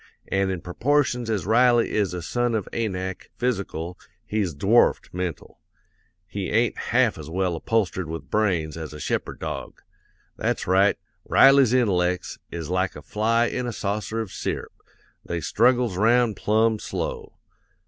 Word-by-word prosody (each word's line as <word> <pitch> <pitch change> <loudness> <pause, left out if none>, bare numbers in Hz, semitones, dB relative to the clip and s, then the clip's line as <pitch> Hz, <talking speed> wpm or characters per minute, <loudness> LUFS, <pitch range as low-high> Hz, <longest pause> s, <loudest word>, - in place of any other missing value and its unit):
An' 95 0 +1
in 95 -3 -3
proportions 125 +4 0
as 105 -5 -1
Riley 120 +2 +4
is 105 -4 +1
a 90 - -5
son 120 +4 0
of 105 - -2
Anak, 95 -5 -3
physical, 95 -8 -3 0.3
he's 100 -7 -1
dwarfed 105 +11 +3
mental; 90 -3 -5 0.7
he 95 0 -4
ain't 115 +1 +2
half - - +1
as - - -8
well 90 0 0
upholstered 95 -1 -1
with 80 +1 -7
brains 90 -8 +1
as 80 -2 -6
a 75 - -8
shepherd - - -2
dog. - - -6 0.5
That's - - -1
right; 95 +2 +3 0.3
Riley's 135 -3 +6
intellects, 90 -8 +1
is 85 -2 -5
like 95 +1 -1
a - - -10
fly 115 +2 +1
in 125 +1 -2
a - - -2
saucer 105 +1 -3
of 105 -4 -6
syrup, - - -4 0.5
they 85 - -3
struggles 120 - +2
'round 115 +1 +3
plumb 110 +1 +2
slow. 460 - -5
105 Hz, 150 wpm, -24 LUFS, 90-120 Hz, 0.7 s, Riley's